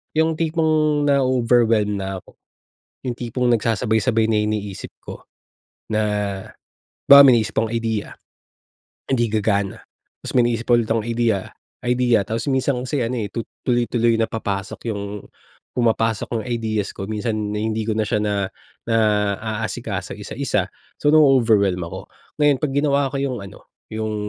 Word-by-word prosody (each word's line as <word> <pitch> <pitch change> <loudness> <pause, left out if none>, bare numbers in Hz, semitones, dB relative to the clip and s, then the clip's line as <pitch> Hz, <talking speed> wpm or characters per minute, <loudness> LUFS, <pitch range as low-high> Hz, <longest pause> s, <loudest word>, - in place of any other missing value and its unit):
Yung 160 0 +1
tipong 155 -2 +1
nao-overwhelm 120 -6 +2
na 95 -1 -5
ako, - - -21 0.6
yung 125 -2 -3
tipong 125 +1 -1
nagsasabay-sabay 115 0 +1
na 105 -1 +2
iniisip 105 -2 -4
ko - - -10 0.6
na 110 -1 0 1.1
halimbawa 140 0 +11
may 120 -4 +6
naisip 110 +1 -4
akong 115 +1 0
idea, 115 -2 -2 0.9
hindi 120 -3 +1
gagana. 100 -2 -1 0.4
Tapos - - -5
may 125 -2 +4
maiisip 115 -1 -2
pa - - +1
ulit 110 - -4
akong 115 -1 0
idea 115 -3 +1 0.5
idea. 120 -4 +2
Tapos 115 +5 -3
minsan 130 -1 +1
kasi, 130 -1 -1
ano 125 +2 -2
eh, 105 - -3
tu 115 +1 -5 0.2
tuloy-tuloy 120 -1 +1
na 115 - +2
papasok 100 -4 -4
yung 100 -1 -5 0.5
pumapasok 115 -1 0
yung - - -8
ideas 110 -4 -2
ko 95 - -5
minsan 110 +2 -2 0.2
hindi 110 +1 -1
ko 110 - -1
na 110 -1 -1
siya 105 - +1
na 100 -2 0 0.4
naaasikaso, 110 -1 -1
isa-isa. - - -2 0.2
So, 145 +1 +2
nao-overwhelm 110 - +4
ako. 85 - -8 0.3
Ngayon 145 -2 +5
'pag 145 - 0
ginawa 140 0 +2
ko - - -2
yung 135 -3 -1
ano, 95 - -14 0.2
yung, 110 0 -3
115 Hz, 145 wpm, -21 LUFS, 105-125 Hz, 1.1 s, halimbawa